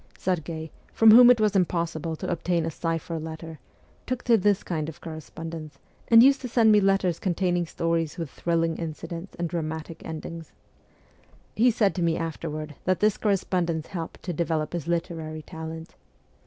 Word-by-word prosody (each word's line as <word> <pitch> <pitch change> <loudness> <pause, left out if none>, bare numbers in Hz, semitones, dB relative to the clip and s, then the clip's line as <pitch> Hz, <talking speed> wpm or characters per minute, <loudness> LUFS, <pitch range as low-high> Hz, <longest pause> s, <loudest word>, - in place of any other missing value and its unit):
Serghei, 160 -3 -3 0.2
from 225 -1 +6
whom 245 +2 +9
it 250 -2 +6
was 215 -2 +2
impossible 170 -3 0
to - - -6
obtain 170 -1 0
a 165 - -2
cipher 165 +1 -3
letter, 160 0 -8 0.5
took 255 -1 -2
to 235 - +5
this 205 -1 +2
kind 160 -3 -3
of 160 - -11
correspondence, 160 -1 -8 0.3
and 230 0 +8
used 275 +1 +5
to 255 - -4
send 230 -2 +4
me 210 -1 +6
letters 195 -3 +2
containing 175 -2 0
stories 165 -2 -1
with 165 -5 -5
thrilling 165 -1 0
incidents 165 +2 -6
and 170 -1 -1
dramatic 160 -1 -5
endings. 160 0 -7 1.0
He 240 +3 +5
said 210 -4 +2
to 180 - -3
me 165 -1 +1
afterward 155 -2 -4
that 185 -1 +1
this 210 -1 +3
correspondence 180 -5 -1
helped 165 -4 -6
to 180 - -3
develop 155 -1 -1
his 170 -3 -4
literary 165 -2 -3
talent. 160 +1 -8
165 Hz, 165 wpm, -26 LUFS, 160-190 Hz, 1.0 s, whom